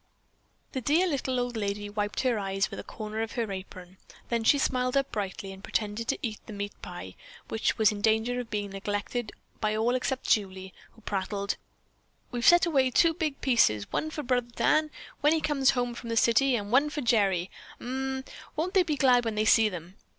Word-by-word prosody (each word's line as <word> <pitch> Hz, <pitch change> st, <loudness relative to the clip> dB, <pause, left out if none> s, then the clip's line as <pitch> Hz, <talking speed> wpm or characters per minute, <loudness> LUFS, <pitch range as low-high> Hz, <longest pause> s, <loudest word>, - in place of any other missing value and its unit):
The 260 Hz, -, -3 dB
dear 310 Hz, +9 st, +3 dB
little 265 Hz, -6 st, -1 dB
old 245 Hz, -1 st, -2 dB
lady 205 Hz, -1 st, -2 dB
wiped 205 Hz, 0 st, -2 dB
her 250 Hz, -4 st, +1 dB
eyes 195 Hz, -1 st, -1 dB
with -, -, -6 dB
a -, -, -6 dB
corner 215 Hz, 0 st, -5 dB
of 225 Hz, -, -3 dB
her 230 Hz, -4 st, -2 dB
apron; 185 Hz, -1 st, -8 dB, 0.3 s
then 235 Hz, -1 st, 0 dB
she 285 Hz, -, +5 dB
smiled 255 Hz, -1 st, +1 dB
up 275 Hz, 0 st, 0 dB
brightly, 195 Hz, -1 st, -4 dB
and 190 Hz, +1 st, -13 dB
pretended 215 Hz, +2 st, -2 dB
to -, -, 0 dB
eat 220 Hz, -3 st, -3 dB
the 220 Hz, -, -7 dB
meat 205 Hz, 0 st, -4 dB
pie, -, -, -8 dB, 0.4 s
which 220 Hz, -, 0 dB
was 220 Hz, -1 st, +5 dB
in 205 Hz, -1 st, -5 dB
danger 225 Hz, +3 st, +2 dB
of 245 Hz, -2 st, -6 dB
being 205 Hz, -1 st, -3 dB
neglected 205 Hz, +3 st, -3 dB, 0.3 s
by 215 Hz, -1 st, 0 dB
all 230 Hz, +3 st, +2 dB
except 255 Hz, +1 st, -2 dB
Julie, 190 Hz, -2 st, 0 dB, 0.2 s
who 225 Hz, -, -20 dB
prattled, 200 Hz, 0 st, -2 dB, 0.8 s
"We've 240 Hz, -2 st, -3 dB
set 345 Hz, +5 st, +7 dB
away 270 Hz, -6 st, +3 dB
two 330 Hz, +6 st, +4 dB
big 310 Hz, -4 st, -3 dB
pieces, 110 Hz, -, +3 dB
one 310 Hz, -, -1 dB
for 305 Hz, -1 st, -5 dB
brother 245 Hz, -2 st, 0 dB
Dan, 310 Hz, 0 st, +3 dB, 0.3 s
when 295 Hz, +2 st, +4 dB
he 325 Hz, -, +2 dB
comes 280 Hz, -3 st, +2 dB
home 245 Hz, -2 st, +1 dB
from 235 Hz, 0 st, -8 dB
the 230 Hz, -, -1 dB
city, 245 Hz, +4 st, +4 dB
and 205 Hz, -2 st, -3 dB
one 280 Hz, +4 st, +4 dB
for 295 Hz, 0 st, -4 dB
Gerry. 200 Hz, -7 st, +2 dB, 0.3 s
Umm, 265 Hz, +1 st, -3 dB, 0.3 s
won't 340 Hz, +5 st, -1 dB
they 385 Hz, -, +5 dB
be 325 Hz, -4 st, 0 dB
glad 250 Hz, -3 st, +4 dB
when 225 Hz, -2 st, -2 dB
they 215 Hz, +1 st, +1 dB
see 220 Hz, 0 st, +5 dB
them? 180 Hz, 0 st, -9 dB
230 Hz, 205 wpm, -28 LUFS, 205-265 Hz, 0.8 s, set